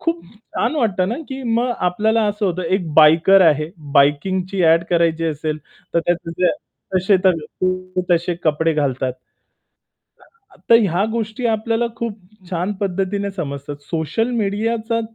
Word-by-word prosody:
खूप 170 +1 -2 0.3
छान 245 +7 0
वाटतं 195 -9 +1
ना, 235 - -2
की 265 0 -6
मग 240 +2 +1
आपल्याला 220 +5 +1
असं 205 0 -1
होतं 180 0 -2
एक 175 -2 -1
बायकर 165 +5 +6
आहे 150 0 +2 0.2
बाइकिंगची 185 +7 +2
ॲड 165 +1 +4
करायची 165 -1 +2
असेल, 155 0 -3 0.4
तर 170 - +4
त्याचे 175 -1 -1
ते 180 - +5 0.5
तसे 190 +2 +3
तर 185 -2 +4 0.3
ते 185 0 -1
तसे 175 0 +2
कपडे 160 +1 +2
घालतात. 130 -3 -1 1.6
तर 230 - +8
ह्या 190 -1 +1
गोष्टी 225 +1 -3
आपल्याला 225 +1 0
खूप 230 -3 -4 0.3
छान 180 +3 -2
पद्धतीने 195 +1 -1
समजतात. 145 -5 -5
सोशल 165 - -2
मीडियाचा 225 +1 -1
185 Hz, 140 wpm, -19 LUFS, 165-215 Hz, 1.6 s, तर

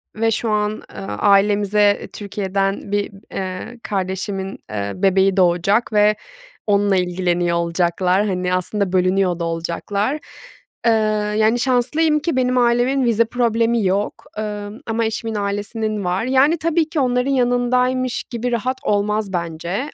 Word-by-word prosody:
ve 225 +1 +1
şu 225 +1 -1
an, 210 0 +1 0.3
ııı, 195 - -6
ailemize 205 0 +2
Türkiye'den 195 -1 -2
bir, 205 0 -1 0.2
eee, 190 +5 -5
kardeşimin, 190 0 -3
eee, 100 -1 -3
bebeği 195 0 +2
doğacak 190 +6 +2
ve 210 0 +4 0.5
onunla 205 -1 +3
ilgileniyor 175 -1 0
olacaklar. 175 +3 +1
Hani, 180 -2 -1
aslında 185 +1 -1
bölünüyor 185 -1 +2
da 170 - -2
olacaklar. 185 - -2 0.7
Eee, - - +6 0.5
yani, 220 +2 +3
şanslıyım 270 +5 +2
ki 330 0 -2
benim 255 0 +1
ailemin 245 +2 +2
vize 230 0 +3
problemi 230 -1 +1
yok, 195 +2 -1
ımm, 210 +2 -5
ama 225 0 0
eşimin 225 0 -3
ailesinin 205 +1 -2
var. 180 +4 0
Yani, 265 +6 +3
tabii 325 0 0
ki 315 -2 -2
onların 250 +1 +1
yanındaymış 250 0 +1
gibi 245 0 -4
rahat 250 +3 -1
olmaz 210 0 0
bence. 170 - -3
210 Hz, 130 wpm, -20 LUFS, 190-240 Hz, 0.7 s, Eee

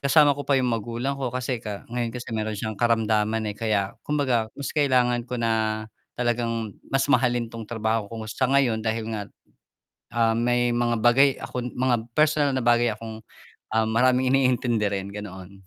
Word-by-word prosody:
kasama 145 +1 +5
ko 145 - -6
pa 140 - +2
yung 125 -2 +1
magulang 120 +5 -3
ko. 130 - -1
Kasi 125 0 -3
ka 105 -3 -6
ngayon 120 -1 -1
kasi 125 0 -7
meron 110 -1 -2
siyang 110 +1 -4
karamdaman, 110 -1 +2
eh, - - -18
kaya 105 -3 0
kumbaga 130 -7 0
mas 140 - -4
kailangan 125 -5 +2
ko 125 - -3
na 110 -2 0 0.3
talagang 115 -3 -1 0.2
mas 135 0 +1
mahalin 120 -2 +1
'tong 115 -2 -8
trabaho 110 -2 -1
ko 115 0 -6
ngayon 130 +1 +1
dahil 110 0 -2
nga, 105 -2 -3 0.9
ah, 115 -1 +2
may 120 +1 +1
mga 120 -1 +1
bagay 130 +4 +4
akong 125 0 -5
mga 125 -2 +1 0.2
personal 150 -1 +3
na 130 -1 -1
bagay 120 0 +4
akong, 110 0 -7 0.5
ah, 110 - +4
maraming 125 +2 +3
iniintindi 125 -4 +2
rin, 100 -1 -3
ganoon. 95 -2 -9
120 Hz, 170 wpm, -25 LUFS, 110-125 Hz, 0.9 s, kasama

